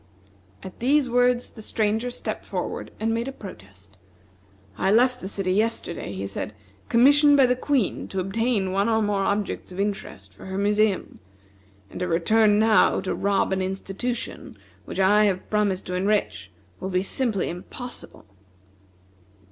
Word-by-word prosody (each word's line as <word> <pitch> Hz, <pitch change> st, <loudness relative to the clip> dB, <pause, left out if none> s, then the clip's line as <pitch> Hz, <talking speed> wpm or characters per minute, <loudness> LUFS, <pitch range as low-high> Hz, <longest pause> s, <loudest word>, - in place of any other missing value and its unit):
At 190 Hz, -, -10 dB
these 275 Hz, +3 st, +3 dB
words 245 Hz, 0 st, +2 dB
the 220 Hz, -, -11 dB
Stranger 220 Hz, +2 st, -1 dB
stepped 245 Hz, -, -5 dB
forward -, -, -4 dB
and 225 Hz, +1 st, 0 dB
made 230 Hz, +2 st, -2 dB
a -, -, -3 dB
protest. 95 Hz, -, -13 dB, 0.8 s
"I 190 Hz, -, +1 dB
left 250 Hz, +3 st, +3 dB
the -, -, -5 dB
city 195 Hz, -2 st, -2 dB
yesterday," 215 Hz, -, -1 dB
he 100 Hz, 0 st, -5 dB
said, 105 Hz, +2 st, -5 dB, 0.3 s
"commissioned 285 Hz, +4 st, +6 dB
by 270 Hz, -, +6 dB
the 250 Hz, 0 st, +2 dB
Queen 255 Hz, -5 st, -1 dB
to 190 Hz, -, -4 dB
obtain 195 Hz, +1 st, 0 dB
one 200 Hz, +3 st, +1 dB
or 220 Hz, -1 st, +2 dB
more 205 Hz, -1 st, 0 dB
objects 200 Hz, -1 st, -2 dB
of 180 Hz, -, -8 dB
interest 195 Hz, -, -4 dB
for 100 Hz, -, -12 dB
her 190 Hz, 0 st, -4 dB
museum; 205 Hz, 0 st, +1 dB, 0.7 s
and -, -, -7 dB
to 180 Hz, -, -1 dB
return 205 Hz, +5 st, +3 dB
now 220 Hz, 0 st, +4 dB
to 185 Hz, -, -2 dB
rob 200 Hz, -1 st, +1 dB
an 190 Hz, -, 0 dB
institution 195 Hz, +6 st, -4 dB, 0.3 s
which -, -, -6 dB
I 205 Hz, +3 st, +5 dB
have 190 Hz, -2 st, -1 dB
promised 205 Hz, -3 st, +1 dB
to 180 Hz, -, -5 dB
enrich 180 Hz, -, 0 dB, 0.3 s
will 190 Hz, -, -4 dB
be 185 Hz, 0 st, 0 dB
simply 220 Hz, -2 st, -1 dB
impossible." 240 Hz, -, -9 dB
205 Hz, 155 wpm, -24 LUFS, 185-230 Hz, 0.8 s, commissioned